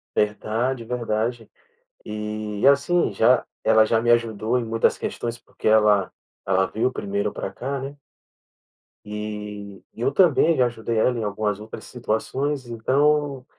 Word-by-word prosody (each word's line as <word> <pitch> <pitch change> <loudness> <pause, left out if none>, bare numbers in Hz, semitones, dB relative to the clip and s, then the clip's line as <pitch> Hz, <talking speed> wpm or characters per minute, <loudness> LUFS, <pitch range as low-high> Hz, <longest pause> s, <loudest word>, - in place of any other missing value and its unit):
Verdade, 115 +4 0
verdade, 115 0 -2 0.6
e, 105 0 -3
assim, 140 0 +3
já 120 +5 +3 0.2
ela 110 0 +5
já 115 - +2
me 120 +1 +1
ajudou 115 0 +1
em 120 - -2
muitas 115 0 +1
questões, 120 0 -4
porque - - -11
ela 105 -2 +4 0.3
ela 95 0 +2
veio 115 +6 -1
primeiro 100 -1 -2
para - - -5
cá, 135 +2 -4
né. 140 +2 -7 1.1
Eh, 105 -1 -6
e - - -10
eu 135 - +1
também 165 -1 +4
já 125 -3 +3
ajudei 115 -1 -3
ela 125 +2 +2
em - - -2
algumas 105 0 -2
outras 110 +1 -9
situações, 130 +4 -2
então, 140 +3 +1
115 Hz, 140 wpm, -23 LUFS, 105-130 Hz, 1.1 s, ela